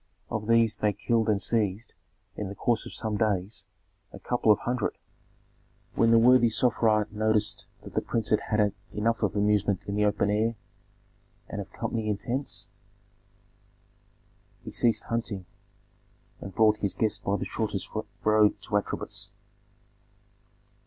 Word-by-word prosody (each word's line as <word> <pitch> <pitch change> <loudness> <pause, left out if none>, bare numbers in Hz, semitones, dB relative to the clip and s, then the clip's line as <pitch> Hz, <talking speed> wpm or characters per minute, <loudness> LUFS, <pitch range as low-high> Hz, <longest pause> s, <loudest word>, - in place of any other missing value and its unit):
Of 110 -1 -3
these 115 -2 +4
they 105 -1 +1
killed 115 +2 0
and 105 -2 +2
seized, 105 0 0 0.4
in 105 -2 -4
the 100 - -7
course 115 +2 0
of - - -9
some 110 -1 -2
days, 100 -2 -1 0.5
a - - -10
couple 120 -3 +2
of 105 - +5
hundred. 120 -2 -2 1.0
When 115 - +3
the 115 - +6
worthy 120 0 +6
Sofra 110 -2 +2
noticed 110 0 +1 0.2
that - - -11
the - - +1
prince 115 -2 -2
had 110 - +4
had 105 -2 +2 0.2
enough 115 +2 0
of 105 -2 0
amusement 105 -1 +1
in 100 - -4
the 105 0 +2
open 105 0 +1
air 110 +3 +1 0.9
and - - -4
of - - -10
company 110 -2 -3
intents, 120 +7 -3 2.0
he - - -6
ceased 115 -2 +2
hunting 110 -5 -3 0.9
and 95 -2 -9
brought 110 -1 +4
his 100 -2 -2
guest 110 -1 0
by 100 +1 0
the - - -4
shortest - - -3 0.3
road 105 -1 +4
to 105 -2 0
Atribis. 100 - -4
110 Hz, 145 wpm, -27 LUFS, 105-115 Hz, 2.0 s, the